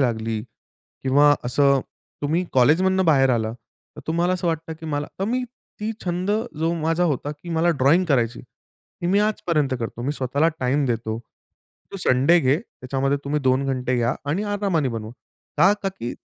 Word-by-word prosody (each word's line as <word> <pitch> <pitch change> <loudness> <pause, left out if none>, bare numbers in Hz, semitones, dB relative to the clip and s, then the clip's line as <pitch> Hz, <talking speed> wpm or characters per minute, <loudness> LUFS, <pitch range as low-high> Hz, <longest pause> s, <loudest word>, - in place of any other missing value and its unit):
लागली 110 -3 -1 0.6
किंवा 145 +2 +5
असं 140 +2 +3 0.4
तुम्ही 165 +5 +1
कॉलेजमधनं 185 +9 +3
बाहेर 135 -5 +4
आला 110 -2 0 0.4
तर - - -8
तुम्हाला 170 +3 +1
असं 180 -1 -2
वाटतं, 165 0 -2
की 160 0 -10
मला 145 -1 -2
तर - - +1
मी 255 +1 0 0.4
ती 220 +1 -2
छंद 180 +2 -1 0.3
जो 165 +1 +1
माझा 165 +3 +1
होता, 145 +2 -4
की 150 +4 -10
मला 165 +1 +2
ड्रॉइंग 165 +8 +5
करायची. 120 -5 +1
ती 175 - -12
मी 195 +3 +3
आजपर्यंत 165 -10 0
करतो. 115 +1 -5
मी 140 +3 -1
स्वतःला 140 +4 +1
टाईम 135 +3 +1
देतो, 115 -2 -2 0.7
तू - - -4
संडे 135 +7 +5
घे. 135 +3 +2
त्याच्यामध्ये 135 - -2
तुम्ही 150 +1 -1
2 130 +1 +2
घंटे 130 -1 -1
घ्या 120 +1 +1 0.2
आणि 190 +7 0
आरामाने 185 -9 0
बनवू. 110 -2 -5 0.5
का? 190 +3 +6
का 195 - +1
की 125 -11 -6
145 Hz, 170 wpm, -23 LUFS, 130-170 Hz, 0.7 s, का